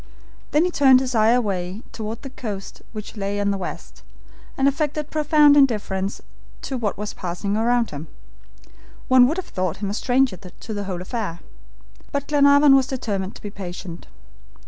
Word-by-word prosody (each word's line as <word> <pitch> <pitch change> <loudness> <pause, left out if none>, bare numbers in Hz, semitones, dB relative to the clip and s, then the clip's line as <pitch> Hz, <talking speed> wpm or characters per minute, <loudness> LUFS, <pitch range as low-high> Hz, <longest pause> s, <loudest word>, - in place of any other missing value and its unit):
Then 305 +4 +3
he 360 - 0
turned 265 -5 +6
his 260 -1 -3
eyes 225 +1 +4
away 195 -2 -3
toward 220 +2 -6
the 270 - -7
coast 205 -7 -7
which 215 0 -8
lay 200 0 -2
on 200 0 +1
the 200 - -1
west, 180 - -7 0.6
and 270 - +3
affected 300 +1 -1
profound 300 -1 +5
indifference 210 -8 +1 0.4
to 270 - -4
what 225 -5 -2
was 210 +1 -4
passing 185 +3 -3
around 235 +1 +1
him. 145 +2 -7 1.0
One 255 -1 +7
would 315 +6 -1
have 375 - -3
thought 185 -3 -2
him 200 0 -3
a - - -3
stranger 250 -2 +1
to 190 +4 -10
the 205 -1 -4
whole 180 -2 -4
affair. 195 -5 -4 0.7
But 280 -1 -2
Glenarvan 285 -1 +6
was 265 -1 +3
determined 205 -8 -3
to - - -13
be 205 - -6
patient. 180 -3 -8
225 Hz, 170 wpm, -22 LUFS, 195-270 Hz, 1.0 s, One